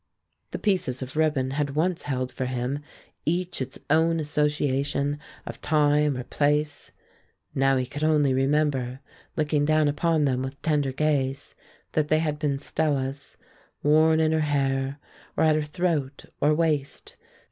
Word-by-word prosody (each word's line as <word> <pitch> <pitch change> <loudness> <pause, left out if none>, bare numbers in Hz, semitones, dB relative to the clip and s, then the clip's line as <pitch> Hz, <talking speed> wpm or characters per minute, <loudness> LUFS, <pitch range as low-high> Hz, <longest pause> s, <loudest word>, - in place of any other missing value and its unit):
The - - -4
pieces 180 - 0
of 130 +2 -9
ribbon 150 -4 +1
had 140 0 -2
once 170 +2 +1
held 130 -1 -1
for 130 - -3
him 125 +2 -2 0.4
each 175 0 -1
its 130 0 -4
own 160 +2 +3
association 145 -1 0 0.3
of - - -8
time 150 -2 +2
or 125 - -4
place; 150 +3 0 0.6
now 135 0 +3
he 130 - 0
could 145 +4 -6
only 150 -3 +3
remember, 135 -2 +1 0.4
looking 150 -1 +1
down 155 0 +3
upon 155 +1 +1
them 130 -2 +1
with 135 +1 -5
tender 145 -4 +1
gaze, 135 -1 -1 0.4
that 155 -1 +1
they 155 - +3
had 150 -2 -1
been 145 -3 0
Stella's, 140 -2 -2 0.5
worn 155 +2 +5
in 160 0 +3
her 160 - +2
hair, 135 -2 0 0.4
or - - +3
at 155 -1 +4
her 155 - +1
throat 150 -3 -2 0.2
or 150 - +4
waist. 150 -4 -1
145 Hz, 150 wpm, -26 LUFS, 135-155 Hz, 0.6 s, worn